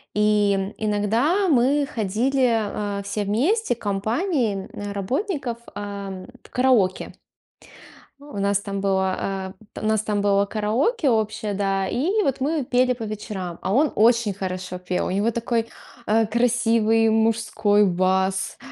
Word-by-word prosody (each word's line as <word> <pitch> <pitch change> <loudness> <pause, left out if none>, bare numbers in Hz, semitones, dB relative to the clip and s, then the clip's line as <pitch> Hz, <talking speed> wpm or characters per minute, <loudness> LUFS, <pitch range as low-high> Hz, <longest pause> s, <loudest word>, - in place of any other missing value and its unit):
и 205 -1 +2
иногда 225 - +1
мы 280 +1 +3
ходили, 220 -2 0
э, - - -6
все 200 +1 -3
вместе, 270 - +1
компанией, 220 - -1
э, 205 0 -6
работников, 260 - -2 0.2
э, 200 -2 -6 0.2
в - - -17
караоке. 245 -8 +1 1.1
У 285 -7 -9
нас 200 0 +2
там 200 -1 -4
было, 190 0 -1 0.2
э, - - -5
у - - -6
нас 220 -1 +2
там 210 -1 -1
было 200 0 +3
караоке 240 - 0
общее, 215 -2 -1
да, 195 -1 0
и 370 - +1
вот 275 -6 -1
мы 295 +1 0
пели 250 +1 +2
по 245 -2 -7
вечерам. 205 -5 -5
А 190 - -1
он 295 +4 +3
очень 230 -1 +4
хорошо 185 -1 -5
пел, 180 0 -2
у - - -2
него 200 +5 +1
такой, 230 0 -1 0.4
э, 220 +1 +3
красивый 225 -1 +2
мужской 220 -2 +2
бас. 190 +1 0
215 Hz, 140 wpm, -23 LUFS, 200-245 Hz, 1.1 s, очень